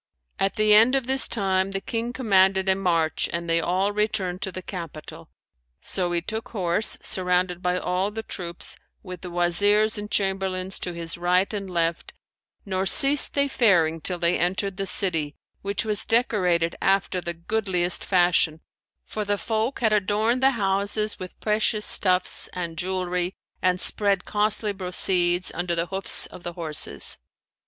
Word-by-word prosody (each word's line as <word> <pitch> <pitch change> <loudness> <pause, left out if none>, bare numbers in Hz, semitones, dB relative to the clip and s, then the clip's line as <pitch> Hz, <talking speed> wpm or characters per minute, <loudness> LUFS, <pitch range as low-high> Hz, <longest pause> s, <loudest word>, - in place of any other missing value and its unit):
At 195 0 0
the 215 -1 +3
end 225 +5 +6
of 265 -2 0
this 265 +1 +5
time, 190 -3 0
the 195 - -2
King 230 +4 -4
commanded 190 -6 +2
a 190 - +5
march 170 -4 0
and 170 0 -3
they 165 0 +2
all 185 +4 0
returned 205 -3 -2
to 190 - -4
the 185 0 -8
capital, 165 -5 -9 0.5
so 180 - -1
he 170 -1 -1
took 220 +4 -5
horse 190 0 +2
surrounded 180 -1 -1
by 180 0 0
all 180 +2 -1
the 220 +1 -6
troops 175 -5 -6 0.3
with 185 -3 -9
the 180 - -7
Wazirs 205 +5 +2
and 210 0 -7
Chamberlains 190 -2 -2
to 180 - -4
his 170 0 -5
right 180 +3 +1
and 200 -2 -5
left 170 -1 -2 0.5
nor 190 -1 -2
ceased 280 +3 +7
they 280 0 +2
faring 175 - +2
till 180 +3 -1
they 170 +1 0
entered 190 +2 -1
the 195 -1 -3
city, 165 -7 -1 0.3
which 200 +2 -2
was 210 -2 +3
decorated 180 -8 +1
after 195 -1 0
the 170 0 -5
goodliest 180 -1 0
fashion; 175 -4 +2 0.4
for 215 - -4
the 205 0 -1
folk 225 +6 -3
had 220 -2 +2
adorned 215 +4 +1
the 265 - +5
houses 200 +1 -1
with 185 -1 -9
precious 215 0 0
stuffs 185 -2 +2
and 170 -2 -5
jewellery 180 +1 -2 0.3
and 185 0 +1
spread 200 -2 0
costly 210 0 0
bro 190 -2 -6
cedes 180 -1 +2
under 175 0 -2
the 170 0 0
hoofs 195 0 +1
of - - -12
the 175 0 -6
horses. 155 - -2
190 Hz, 165 wpm, -24 LUFS, 175-210 Hz, 0.5 s, ceased